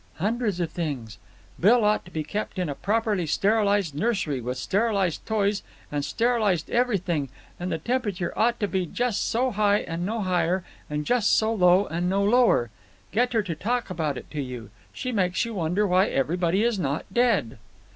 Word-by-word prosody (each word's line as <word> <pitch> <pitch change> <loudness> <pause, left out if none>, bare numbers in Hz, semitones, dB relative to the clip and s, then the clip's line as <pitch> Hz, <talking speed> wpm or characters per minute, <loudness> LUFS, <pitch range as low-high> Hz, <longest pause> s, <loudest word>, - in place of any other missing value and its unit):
"Hundreds 210 +1 -1
of 170 -2 -1
things. 130 -11 -4 0.4
Bill 220 +4 +5
ought 210 0 +2
to - - -12
be 155 -3 -3
kept 205 +6 -4
in 180 -4 -1
a - - -2
properly 205 0 0
sterilized 200 -1 +2
nursery, 160 - -1
with 125 +2 -4
sterilized 195 - 0
toys 205 -2 +1 0.3
and 145 -1 -1
sterilized 220 -6 +1
everything, 185 - 0 0.3
and 180 +1 -3
the - - 0
temperature 205 -2 -2
ought 235 +1 +2
to 205 - +2
be 190 -2 -1
just 245 +3 -1
so 250 +3 +1
high 205 -1 +2
and 165 +1 -4
no 220 +4 -2
higher, 180 -1 +1 0.3
and 150 0 -3
just 240 0 +3
so 220 +1 +2
low 185 -1 +4
and 175 +2 -2
no 195 +1 +1
lower. 210 - +3 0.4
Get 245 +4 +1
her 220 -2 +2
to 180 -4 -3
talk 230 +6 -2
about 155 -6 -2
it - - -10
to 150 - -3
you. 125 -4 -7 0.2
She 255 - -4
makes 185 -4 +1
you 230 - -5
wonder 180 +2 0
why 185 +1 +3
everybody 175 +7 +1
is 235 -4 +1
not 140 -2 -2
dead." 230 - +1
195 Hz, 185 wpm, -25 LUFS, 165-220 Hz, 0.4 s, Bill